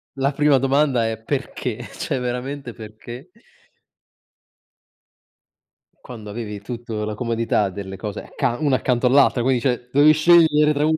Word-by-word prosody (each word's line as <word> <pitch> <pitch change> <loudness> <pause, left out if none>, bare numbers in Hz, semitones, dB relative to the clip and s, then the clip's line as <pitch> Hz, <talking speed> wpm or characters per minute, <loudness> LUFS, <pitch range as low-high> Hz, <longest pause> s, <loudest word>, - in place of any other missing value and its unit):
la 135 +1 0
prima 145 -1 +3
domanda 135 -3 +1
è: 110 0 -5
"Perché?" 135 +2 -4
cioè 130 - -3
veramente 125 +1 -5
perché 120 +7 -11 2.8
quando 110 -4 -10
avevi 105 -2 -6
tutto 115 -1 -6
la 105 0 -4
comodità 115 -3 0
delle 95 0 -8
cose 105 -1 -6
accan 130 +1 -3
una 135 -3 +3
accanto 125 0 0
all'altra, 135 -1 +4
quindi 130 0 +1
cioè, 125 -2 -2
dovevi 145 +2 +6
scegliere 155 -2 +4
tra 145 +1 0
un 160 0 +2
125 Hz, 135 wpm, -21 LUFS, 115-140 Hz, 2.8 s, dovevi